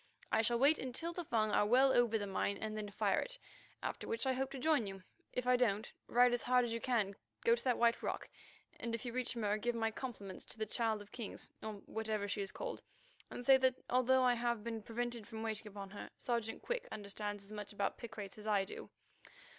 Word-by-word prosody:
I - - +5
shall 235 +2 +3
wait 280 +6 +5
until 265 +7 -2
the 350 - -3
Fung 220 -7 +1
are 210 - +4
well 260 +4 +6
over 235 -2 +4
the 205 - -2
mine 200 +1 0
and 215 +1 -3
then 210 -1 -3
fire 200 - +2
it, - - -3 0.5
after - - -3
which 455 -9 0
I 260 - +3
hope 265 +1 -1
to 275 - -6
join 275 -5 +3
you. 195 -1 -7 0.3
If 250 - -2
I 250 0 +5
don't, 220 -4 +1 0.2
ride 245 +1 +5
as 245 - +1
hard 250 0 +4
as 230 - -2
you 230 - -2
can 215 -6 +1 0.3
go 470 - +7
to 475 - 0
that 250 -2 +2
White 235 0 +4
Rock, - - -2 0.5
and 230 -1 -1
if 230 - -6
you 240 - -3
reach 250 -1 0
Mur 210 -2 +1
give 240 +2 0
my 225 -1 +1
compliments 215 -6 -6
to - - -7
the 220 - -1
Child 220 -1 0
of 205 - -20
Kings, 230 -5 -6
or 220 - -4
whatever 215 -2 -2
she 205 0 -1
is 195 - -3
called, - - -4 0.5
and 245 - -6
say 270 +1 +9
that 260 -1 +3 0.2
although 255 +1 +5
I 250 -1 +5
have 235 -2 0
been 225 -1 -3
prevented 235 0 -3
from 220 0 -5
waiting 220 -1 -2
upon 200 -2 -7
her, 205 - -7
Sergeant 235 -2 -2
Quick - - -2
understands 205 0 -4
as 200 - -15
much 210 -1 -5
about 200 -1 -1
picrates 215 -4 -7
as 210 - -8
I 200 -2 +3
do. - - -7
230 Hz, 235 wpm, -37 LUFS, 210-250 Hz, 0.5 s, say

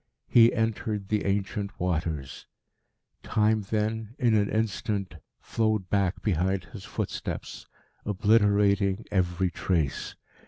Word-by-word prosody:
He 115 0 +6
entered 110 -3 -2
the 105 -1 0
ancient 100 0 -2
waters. 80 -6 -3 0.7
Time 110 0 +2
then, 110 +1 -2
in 120 -3 +2
an 105 -1 +2
instant, 100 -4 -2 0.2
flowed 110 -5 -1
back 100 -2 +1
behind 95 -1 +1
his 105 -3 -11
footsteps, - - -5 0.4
obliterating 100 -1 +2
every 90 -1 +1
trace. 80 -6 -1
100 Hz, 105 wpm, -27 LUFS, 95-110 Hz, 0.7 s, He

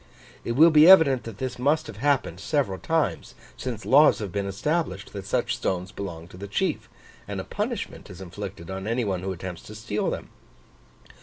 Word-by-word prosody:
It 120 - -2
will 160 +6 +7
be 155 +2 +7
evident 145 -9 +7
that 115 -3 -8
this 130 -2 -4
must 150 +5 +2
have 100 - -9
happened 140 +3 0
several 130 -12 -1
times, 160 -5 -1 0.2
since 120 -4 -5
laws 145 +3 +6
have 100 -4 -5
been 100 0 -2
established 100 - -2
that 100 -1 -7
such - - 0
stones 90 0 -2
belong 85 -4 -7
to - - -13
the 100 +2 -7
chief, 100 - -2 0.4
and - - -4
a - - -3
punishment - - -4
is 90 - -10
inflicted 95 -1 -8
on 95 +1 -5
any 115 +1 0
one 95 -3 -2
who 95 +1 -3
attempts 90 -1 -6
to 105 - -10
steal 105 -1 -2
them. - - -5
105 Hz, 190 wpm, -25 LUFS, 95-140 Hz, 0.4 s, will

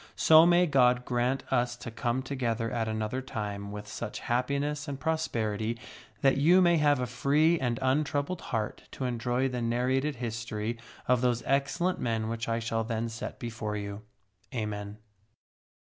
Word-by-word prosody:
So 160 +1 +7
may 175 +1 +5
God 125 -5 +3
grant 125 +2 0
us 120 0 +1
to 120 - -8
come 120 +3 -1
together 120 -4 -2
at 115 -3 -1
another 110 +4 -2
time 105 -5 -5
with 105 0 -7
such 105 +1 -5
happiness 140 +5 -1
and 140 -1 -4
prosperity 115 -9 -1 0.4
that 135 0 +4
you 170 +7 +6
may 175 -2 +5
have 145 -3 +3
a 125 - 0
free 150 +7 +2
and 120 -3 0
untroubled 145 +5 0
heart 110 -2 -3
to 130 - -3
enjoy 125 +1 0
the 125 -2 -3
nar 120 +1 0
rated 135 +3 +1
history 115 -1 -4 0.3
of 125 -1 +3
those 120 -2 +1
excellent 140 +7 +1
men 110 -2 -1
which 115 0 -3
I 115 - +1
shall 115 -1 -1
then 115 0 -2
set 115 +1 -6
before 110 -3 -4
you. 100 0 -5 0.5
Amen. 105 -2 -4
120 Hz, 160 wpm, -29 LUFS, 115-140 Hz, 0.5 s, So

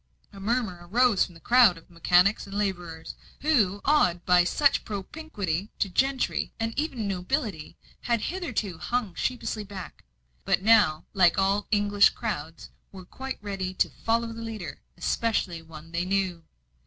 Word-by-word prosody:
A 200 - -11
murmur 215 -3 -1
arose 240 -1 +4
from 175 - -15
the - - -14
crowd 235 -4 +5
of 165 - -16
mechanics 180 +4 +3
and 200 +1 -6
labourers, 175 -5 -3 0.3
who, 215 -10 +2
awed 180 - +3
by 180 -1 +5
such 280 +10 +2
propinquity 200 - -4
to 195 - 0
gentry 265 +7 0
and 225 0 -1
even 265 -7 -2
nobility, 195 - -3 0.2
had 235 -2 0
hitherto 225 - -3
hung 240 -6 -2
sheepishly 225 +1 -2
back; 195 -3 -9 0.4
but - - +1
now, 200 -8 +4
like 180 -3 +4
all 195 +1 +1
English 205 -1 +4
crowds, 165 -8 -5 0.2
were 185 -2 -11
quite 265 +7 -6
ready 190 -2 -4
to - - +1
"follow 230 0 -1
the 230 - -8
leader," 215 -10 -6 0.2
especially 180 -2 -1
one 160 0 -12
they 170 +1 -1
knew. 185 -3 -1
200 Hz, 150 wpm, -27 LUFS, 180-230 Hz, 0.4 s, crowd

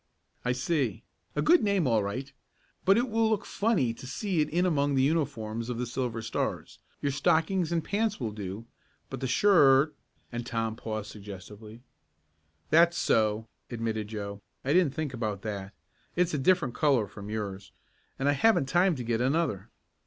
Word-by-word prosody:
"I 125 - +1
see. 125 - -1 0.3
A - - +1
good 345 +2 +6
name 200 -5 +2
all 115 -4 +3
right, 130 +8 -4 0.5
but 195 +2 +6
it 245 +2 +2
will 225 -1 +2
look 215 -3 0
funny 200 - +1
to 125 +2 -10
see 180 - 0
that - - -7
in 175 +3 +2
among 145 -5 +1
the 130 - +3
uniforms 125 -7 -1
of 120 - -3
the 125 - -1
Silver 120 -2 -3
Stars. 110 - -3 0.2
Your 140 - +1
stockings 160 +5 +1
and 165 -2 0
pants 215 +4 -1
will 115 -5 -2
do, 105 +1 -6 0.5
but - - -4
the 130 - -2
shirt 145 -2 +5 0.2
" - - -40
and 120 0 -3
Tom 115 -2 -2
paused 110 -2 -5
suggestively. 105 +3 -10 0.9
"That's 170 +2 +5
so," 110 0 +1 0.2
admitted 115 -3 -3
Joe. 100 -2 -6 0.2
"I 140 - +2
didn't 175 -6 +3
think 155 -4 -3
about 110 -5 -3
that. 100 -3 -5 0.4
It's 175 -1 +1
a 150 - 0
different 145 -4 +2
color 135 -7 +2
from 100 +1 -9
yours, 100 -3 -5 0.5
and 135 - -1
I - - +5
haven't 145 +2 +3
time 175 +5 +3
to 125 - -5
get 115 0 0
another." 135 - 0
130 Hz, 175 wpm, -29 LUFS, 110-165 Hz, 0.9 s, good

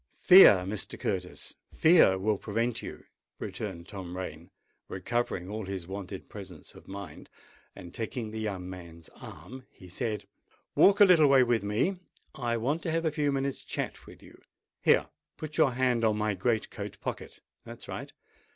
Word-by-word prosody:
"Fear, 140 - +8
Mr. 100 +2 -4
Curtis—fear 160 - +2
will 105 +2 0
prevent 115 +2 -2
you," - - -8 0.3
returned 90 -5 -6
Tom 90 -3 -7
Rain, 85 -2 -7 0.4
recovering 95 -2 -2
all 105 +1 -5
his 95 -3 -5
wonted 95 0 -7
presence 95 -6 -11
of - - -16
mind: 95 -5 -9 0.5
and, 85 -1 -11
taking 115 0 -4
the 110 - -5
young 100 -4 -4
man's 85 -3 -10
arm, 130 +1 -11
he 90 - -15
said, 105 +2 -3 0.5
"Walk 200 +1 +5
a - - +11
little 170 -6 +6
way 135 -2 +6
with 120 -2 +1
me. 115 - 0 0.4
I 120 -3 -2
want 140 +8 -1
to 165 - -2
have 165 +1 0
a 160 - +2
few 145 -1 0
minutes' 135 0 -2
chat - - -5
with - - -14
you. - - -16 0.4
Here—put 155 -1 -1
your 130 - +4
hand 125 -2 +1
on 110 -1 +2
my 105 0 0
great 110 +4 -1
coat - - -7
pocket: - - -6 0.2
that's - - -11
right! - - -6
110 Hz, 160 wpm, -29 LUFS, 95-130 Hz, 0.5 s, a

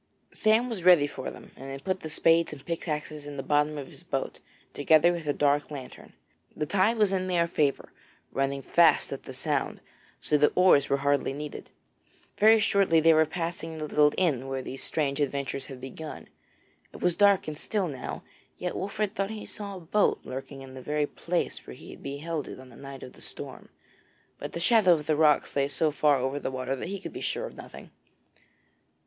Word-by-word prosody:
Sam 220 +3 +3
was 220 -8 -5
ready 175 -5 +7
for 135 -2 -5
them - - -12
and 135 +1 -9
had 135 0 -7
put 185 -1 -1
the 160 - -7
spades 165 +2 +3
and 145 -3 -10
pickaxes 155 -3 -4
in 145 -1 -7
the 135 - -3
bottom 150 +2 +1
of 140 - -5
his - - -12
boat, - - -3 0.3
together 155 +4 +5
with 170 -3 -5
a - - +3
dark 145 0 +1
lantern. 135 -4 -9 0.4
The 150 - -2
tide 200 +7 +2
was 210 -3 +3
in 185 -1 0
their 175 -2 +2
favour 150 -4 0 0.4
running 135 0 -1
fast 170 +5 +4
up - - -8
the - - -8
Sound, - - -1 0.4
so 150 - +1
that 150 - +4
oars 180 -6 +5
were 140 - +3
hardly 140 -1 +2
needed. 150 +1 -7 0.7
Very 220 +1 +7
shortly 200 -6 +3
they 165 +1 +6
were 160 0 +4
passing 165 -1 -4
the 155 - -3
little 150 0 +4
inn 140 -8 +1
where 135 -1 -3
these 135 - -6
strange 145 -2 -1
adventures 140 -1 -2
had 135 -2 -9
begun; 135 +4 -8 0.6
it - - -11
was 180 -2 +1
dark 200 -4 +4
and 155 - -4
still 205 -4 -1
now, 135 -5 -6 0.3
yet 180 - -3
Wolfert 200 +1 -2
thought 195 -2 -1
he 220 -1 -6
saw 200 -2 -6
a - - -10
boat 200 +5 +1
lurking 135 +1 -7
in 130 -1 -11
the 130 - -8
very 150 +2 0
place 170 +4 -3
where 60 - -8
he - - -12
had - - -12
beheld 145 +2 -4
it - - -8
on 130 0 -13
the 120 - -15
night 135 0 -9
of 125 - -10
the - - -17
storm, - - -9 0.7
but - - -6
the - - -3
shadow 195 -1 +5
of 150 -3 -1
the 155 0 +2
rocks 150 -1 +3
lay 140 -1 +2
so 150 +3 +1
far 150 -1 +3
over 135 +2 -2
the - - -3
water 130 0 -3
that 135 - -6
he 200 0 -4
could - - -8
be - - -6
sure - - -2
of - - -9
nothing. - - -11
150 Hz, 210 wpm, -28 LUFS, 140-180 Hz, 0.7 s, ready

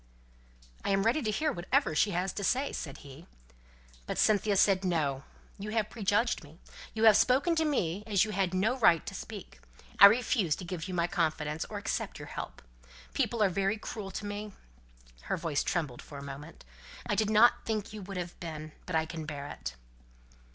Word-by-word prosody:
"I - - -2
am 195 0 +2
ready 240 +8 +2
to 220 - -1
hear 305 +8 +1
whatever 255 - +1
she 180 +7 +3
has 180 0 -1
to 200 - -4
say," 265 +7 +1
said 140 -4 -5
he. 140 +5 -12 0.8
But - - -3
Cynthia 210 -1 +3
said, 195 -1 +4
"No! 150 -7 0 0.4
you 205 +2 -5
have 220 -2 0
prejudged 215 -1 +1
me; 150 +2 -15 0.4
you 220 - -1
have 220 -2 +8
spoken 275 - +3
to 320 - +2
me 200 - 0
as 205 -2 +3
you 215 - -5
had 195 -3 0
no 215 +8 +1
right 170 -8 +5
to - - -6
speak. 205 0 -8 0.4
I 200 - +13
refuse 205 -7 +2
to 185 - -8
give 175 -1 -5
you 185 - -4
my 170 -1 +2
confidence, 160 -4 -1
or - - -6
accept - - -3
your - - -9
help. - - -7 0.5
People 230 -3 +1
are 200 - +4
very 195 +3 0
cruel 210 -1 -6
to 205 - -6
me" 205 0 -5 0.7
her - - -1
voice 160 -4 -1
trembled 150 -9 -2
for 145 - -10
a 140 - -7
moment 140 - -9 0.4
"I - - -1
did 215 -1 +1
not 220 +3 +5
think 215 -2 -2
you 215 - -7
would 195 0 -7
have 175 -1 -5
been. 155 -2 -6 0.2
But 180 - -2
I 160 0 +2
can 160 -1 -6
bear 145 -2 -5
it." 65 -3 -6
195 Hz, 200 wpm, -30 LUFS, 160-215 Hz, 0.8 s, I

